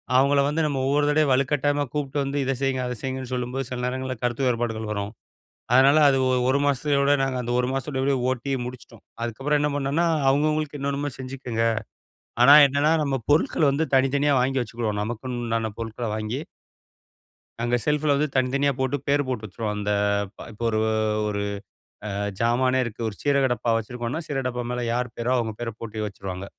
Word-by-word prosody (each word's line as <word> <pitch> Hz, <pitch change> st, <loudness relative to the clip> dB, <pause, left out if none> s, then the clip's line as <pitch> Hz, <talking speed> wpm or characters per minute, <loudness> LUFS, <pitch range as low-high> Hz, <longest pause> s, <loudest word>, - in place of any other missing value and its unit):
அவுங்கள 140 Hz, +2 st, +4 dB
வந்து 150 Hz, +3 st, 0 dB
நம்ம 145 Hz, -3 st, -1 dB
ஒவ்வொரு 145 Hz, +1 st, +2 dB
தடவையும் 150 Hz, -1 st, +3 dB
வலுக்கட்டாயமா 145 Hz, +2 st, +1 dB
கூப்ட்டு 145 Hz, -1 st, -3 dB
வந்து 140 Hz, +1 st, -3 dB
இத 135 Hz, -, +1 dB
செய்ங்க, 135 Hz, -1 st, 0 dB
அத 125 Hz, -, -3 dB
செய்ங்கன்னு 130 Hz, -1 st, -4 dB
சொல்லும்போது, 125 Hz, +2 st, -3 dB
சில 125 Hz, -, -4 dB
நேரங்கள்ல 130 Hz, +1 st, -3 dB
கருத்து 120 Hz, +2 st, 0 dB
வேறுபாடுகள் 115 Hz, -3 st, -1 dB
வரும். 100 Hz, +1 st, -4 dB, 0.6 s
அதனால 135 Hz, +4 st, +6 dB
அது 135 Hz, -1 st, +4 dB
ஒரு, 130 Hz, 0 st, +2 dB
ஒரு 130 Hz, +2 st, +3 dB
மாசத்தயோட 140 Hz, 0 st, +2 dB
நாங்க 135 Hz, -1 st, 0 dB
அந்த 120 Hz, 0 st, -3 dB
ஒரு 125 Hz, -, +1 dB
மாசத்தோட 135 Hz, 0 st, -1 dB, 0.2 s
ஓட்டி 130 Hz, +2 st, -2 dB
முடிச்சிட்டோம். 125 Hz, 0 st, -10 dB, 0.2 s
அதுக்கப்புறம் 135 Hz, +6 st, 0 dB
என்ன 150 Hz, 0 st, +1 dB
பண்ணன்னா, 145 Hz, +4 st, +1 dB, 0.2 s
அவுங்கவுங்களுக்கு, 150 Hz, +1 st, +1 dB
என்னென்னமோ 140 Hz, +1 st, -2 dB
செஞ்சிக்கங்க. 130 Hz, -3 st, -3 dB, 0.8 s
ஆனா 140 Hz, +4 st, +9 dB
என்னான்னா, 140 Hz, +3 st, +2 dB
நம்ம 135 Hz, -2 st, 0 dB
பொருட்கள் 150 Hz, 0 st, +3 dB
வந்து 150 Hz, +4 st, 0 dB
தனித்தனியா, 140 Hz, +2 st, +2 dB
வாங்கி 130 Hz, +1 st, +1 dB
வச்சுகிருவோம். 110 Hz, -3 st, -3 dB
நமக்குன்னு 120 Hz, +3 st, -4 dB
உண்டான 115 Hz, -1 st, -1 dB
பொருட்கள 115 Hz, +1 st, -4 dB
வாங்கி 110 Hz, +5 st, -3 dB, 1.2 s
அங்க 120 Hz, +1 st, +1 dB
செல்ஃப்ல 150 Hz, -1 st, +2 dB
வந்து 150 Hz, +2 st, +1 dB
தனித்தனியா 135 Hz, +2 st, +2 dB
போட்டு, 130 Hz, +2 st, 0 dB
பேரு 145 Hz, +1 st, +3 dB
போட்டு 125 Hz, -4 st, -3 dB
வச்சிருவோம். 105 Hz, +2 st, -4 dB
அந்த 105 Hz, 0 st, -2 dB, 0.6 s
இப்ப 110 Hz, +2 st, -8 dB
ஒரு, 110 Hz, -1 st, 0 dB, 0.5 s
ஒரு 100 Hz, -1 st, -2 dB, 0.7 s
அ -, -, -4 dB, 0.3 s
ஜாமானே 130 Hz, +2 st, +2 dB
இருக்கு. 120 Hz, 0 st, -7 dB
ஒரு 105 Hz, -, -10 dB
சீரக 140 Hz, -2 st, +3 dB
டப்பா 120 Hz, 0 st, -1 dB
வச்சிருக்கோன்னா, 120 Hz, +6 st, -4 dB
சீரகடப்பா 125 Hz, -3 st, -2 dB
மேல 125 Hz, 0 st, -2 dB
யார் 125 Hz, -1 st, -2 dB
பேரோ, 120 Hz, +2 st, 0 dB
அவுங்க 115 Hz, -2 st, -1 dB
பேர 120 Hz, -1 st, -2 dB
போட்டு 110 Hz, -1 st, -4 dB
வச்சிருவாங்க. 95 Hz, -2 st, -6 dB
130 Hz, 165 wpm, -24 LUFS, 120-140 Hz, 1.2 s, ஆனா